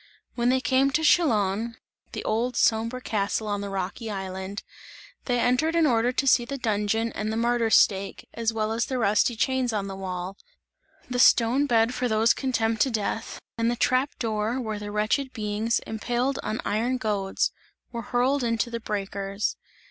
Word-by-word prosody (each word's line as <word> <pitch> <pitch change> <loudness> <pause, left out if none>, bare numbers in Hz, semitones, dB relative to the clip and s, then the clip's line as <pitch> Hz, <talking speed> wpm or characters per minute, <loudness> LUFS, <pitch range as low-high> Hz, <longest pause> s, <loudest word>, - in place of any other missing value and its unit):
When 240 0 +1
they 260 0 +2
came 265 +1 +3
to 315 +3 0
Chillon, 225 - +2 0.4
(the - - -4
old 235 +3 -1
sombre 230 +3 +2
castle 215 -1 -1
on 205 -1 -2
the 200 - -4
rocky 195 +4 -4
island) 190 0 -5 0.6
they 245 -1 +1
entered 255 +8 +2
in 335 -1 +4
order 240 -3 +2
to 260 +2 -1
see 255 -2 +5
the 275 +4 -5
dungeon 220 0 0
and 215 0 -3
the 220 - -2
martyr's 235 -1 +2
stake, 195 -1 +2
as 230 -1 0
well 220 -1 -1
as 230 +1 -1
the 260 - -2
rusty 215 +1 +2
chains 260 +1 0
on 205 -2 -2
the 195 -1 -6
wall; 185 0 -5 0.7
the 250 0 -3
stone 245 +4 +5
bed 230 -1 +3
for 250 0 -1
those 220 0 +3
condemned 225 -4 -1
to 270 - +4
death 225 -1 -3 0.2
and 230 0 +2
the 240 - 0
trap 255 +3 +1
door 220 +2 -1
where 220 -4 -3
the 205 0 -6
wretched 215 +6 0
beings 215 0 -1
impaled 245 +5 -1
on 215 - -3
iron 235 +5 0
goads, 205 -5 -1 0.4
were 235 - -4
hurled 250 +4 +1
into 230 0 0
the 235 - -3
breakers. 200 -1 -3
225 Hz, 180 wpm, -26 LUFS, 210-250 Hz, 0.7 s, see